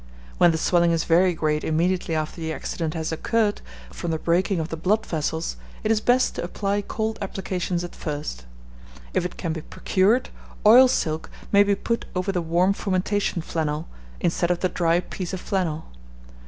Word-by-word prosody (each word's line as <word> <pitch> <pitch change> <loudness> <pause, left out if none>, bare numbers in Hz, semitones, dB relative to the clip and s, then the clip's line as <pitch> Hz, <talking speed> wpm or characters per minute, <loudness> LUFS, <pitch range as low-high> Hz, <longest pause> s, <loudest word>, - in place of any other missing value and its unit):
When 175 - +7
the 160 - +1
swelling 170 +1 +3
is 165 -1 +1
very 175 +1 +3
great 155 -1 0
immediately 170 +1 0
after 155 +2 -3
the 160 0 -2
accident 160 0 -3
has 160 -1 -2
occurred, 210 +5 0 0.3
from 175 - -5
the 160 - 0
breaking 175 +3 +1
of 160 +1 -3
the 165 - -3
blood 190 +7 +1
vessels, 160 - -2 0.3
it 215 - +1
is 215 -1 +2
best 250 +3 +3
to - - -4
apply 200 +3 -1
cold 220 +2 -3
applications 185 -2 -2
at 175 - -7
first. 145 - -5 0.7
If - - +1
it 180 - -5
can 165 -3 -2
be 160 - -5
procured, 205 +10 +1 0.4
oil 245 +5 +9
silk 160 -11 -1 0.2
may 200 - +6
be 205 0 +3
put 230 +4 -2
over 185 +2 0
the 180 -2 -1
warm 175 +4 +2
fomentation 195 -2 -1
flannel, 155 -1 -2 0.3
instead 175 0 +1
of 175 -1 0
the 185 - +2
dry 170 0 +2
piece 185 0 -6
of 185 - -3
flannel. 175 -5 -2
175 Hz, 180 wpm, -24 LUFS, 160-195 Hz, 0.7 s, oil